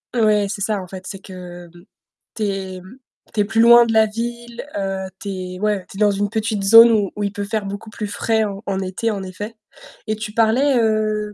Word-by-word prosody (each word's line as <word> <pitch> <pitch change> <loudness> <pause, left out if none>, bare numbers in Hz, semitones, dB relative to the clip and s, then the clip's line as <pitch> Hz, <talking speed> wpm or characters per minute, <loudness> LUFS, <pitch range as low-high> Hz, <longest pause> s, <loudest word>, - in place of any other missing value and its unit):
Ouais, 215 -3 +3
c'est 200 - -5
ça, 205 -1 0
en 180 - -9
fait, 185 0 -9
c'est 195 -1 -7
que, 180 -2 -10
mmh, - - -20 0.6
tu 220 - -3
es 190 -2 -3
mmh, 190 +8 -14 0.4
tu 210 - +1
es - - +4
plus 225 +2 -1
loin 235 +1 +8
de 225 - -2
la 220 0 +5
ville, 235 +3 -6
heu, 195 -1 -3
tu 205 - -9
es 185 -1 -6
ouais, 210 -3 -1
tu 195 - -10
es - - -7
dans 210 -1 +4
une 200 0 -1
petite 220 -2 -2
zone 230 +3 +9
où 205 -4 +1
où 205 - -2
il 200 - -2
peut 205 -2 -4
faire 210 0 -3
beaucoup 200 +2 -7
plus 210 0 -5
frais 220 +1 0
en 200 +1 -6
en 195 -1 -1
été, 190 +4 -2
en 200 -2 -4
effet. 205 +4 -7 0.5
Et 215 - 0
tu 215 0 -6
parlais, 240 +5 +3
hem, 215 -2 0
210 Hz, 240 wpm, -20 LUFS, 195-220 Hz, 0.6 s, zone